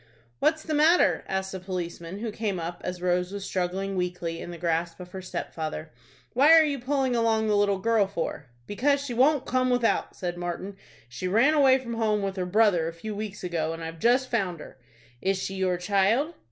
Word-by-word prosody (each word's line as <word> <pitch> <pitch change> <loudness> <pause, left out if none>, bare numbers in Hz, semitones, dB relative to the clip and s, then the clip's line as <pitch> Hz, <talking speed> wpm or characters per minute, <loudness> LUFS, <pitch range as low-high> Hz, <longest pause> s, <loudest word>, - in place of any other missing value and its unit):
"What 315 - +3
is 315 - -13
the 315 - -3
matter?" 315 +4 +4
asked 190 0 -2
a 190 - -4
policeman, 180 -1 -5
who 230 -2 -3
came 205 -4 -2
up 170 +1 -5
as 180 -1 -5
Rose 180 0 +1
was 200 -1 -5
struggling 190 +2 -2
weakly 175 -2 -3
in - - -7
the 175 - -7
grasp 170 0 -1
of 180 -1 -10
her 190 - -6
stepfather. 160 -3 -5 0.4
"What 270 +5 +5
are 325 -1 +8
you 285 -2 -2
pulling 260 0 0
along 225 -1 +2
the 210 -1 +2
little 205 -1 +2
girl 215 0 +2
for?" 165 -6 -4 0.2
"Because 280 - +1
she 250 - -4
won't 275 +4 +3
come 255 0 +1
without," 245 -2 +1
said 175 -2 -4
Martin. 175 +3 -4 0.3
"She 125 +10 -5
ran 230 +11 +4
away 270 -3 +5
from 245 -3 -6
home 215 -2 0
with 195 -1 -2
her 180 -1 -2
brother 190 -4 +3
a 165 - -4
few 210 +6 -6
weeks 210 -1 -6
ago, 165 -3 -1
and 165 0 -7
I've 165 0 -7
just 250 +6 +2
found 190 -8 -1
her." 140 - -12 0.4
"Is 195 0 +1
she 190 +1 -4
your 185 -2 0
child?" 200 - +1
195 Hz, 210 wpm, -26 LUFS, 175-235 Hz, 0.4 s, are